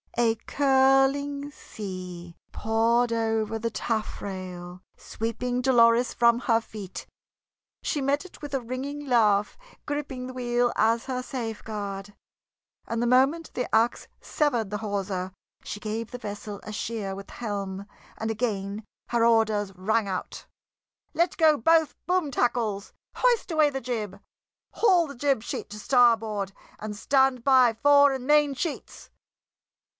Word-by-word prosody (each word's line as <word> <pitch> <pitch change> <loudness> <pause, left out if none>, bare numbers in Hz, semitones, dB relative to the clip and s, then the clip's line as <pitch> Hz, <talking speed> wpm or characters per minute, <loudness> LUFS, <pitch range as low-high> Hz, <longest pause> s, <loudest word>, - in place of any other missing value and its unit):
A 230 -1 +3
curling 275 +1 +2
sea 180 - -8 0.2
poured 230 +2 +1
over 225 -1 0
the 230 +1 -1
taffrail, 185 -5 -4 0.2
sweeping 245 +3 -3
Dolores 240 -1 +4
from 235 0 +4
her 230 -3 +3
feet; 210 -4 -9 0.8
she 290 - -1
met 280 +5 0
it 370 - -14
with 290 -2 -7
a 270 - 0
ringing 270 +5 -5
laugh, 210 -5 +3 0.3
gripping 290 -3 -4
the 255 - -7
wheel 245 -1 0
as 230 +2 +2
her 255 -1 -3
safeguard, 210 -5 -5 0.7
and 230 0 -2
the 240 - +1
moment 270 +7 +2
the 250 - -4
ax 225 +2 +2
severed 245 -9 0
the 210 - -2
hawser 195 -3 -3 0.3
she 205 - -6
gave 220 +1 -4
the 245 - -5
vessel 205 -2 -7
a - - -7
sheer 215 -2 -4
with 195 0 -9
the - - -13
helm, 200 -4 -4 0.3
and 220 - -3
again 210 -2 -2 0.3
her 235 -1 +2
orders 220 -3 +2
rang 210 +3 0
out: 185 -2 -5 0.7
"Let 340 +1 +1
go 310 -2 +5
both 320 +5 +3
boom 360 -5 +1
tackles! 225 -5 -1 0.2
Hoist 485 -6 +2
away 310 -2 +4
the 270 -1 -4
jib! 215 -5 -4 0.5
Haul 370 -7 +4
the 280 - -9
jib 270 -3 0
sheet - - -5
to 210 - -8
starboard, 220 -5 +2 0.3
and 210 0 -5
stand 265 +2 +2
by 255 -3 +5
fore 285 +4 +5
and 265 -2 -4
main 295 -1 +4
sheets!" 315 +3 -5
230 Hz, 140 wpm, -26 LUFS, 210-270 Hz, 0.8 s, go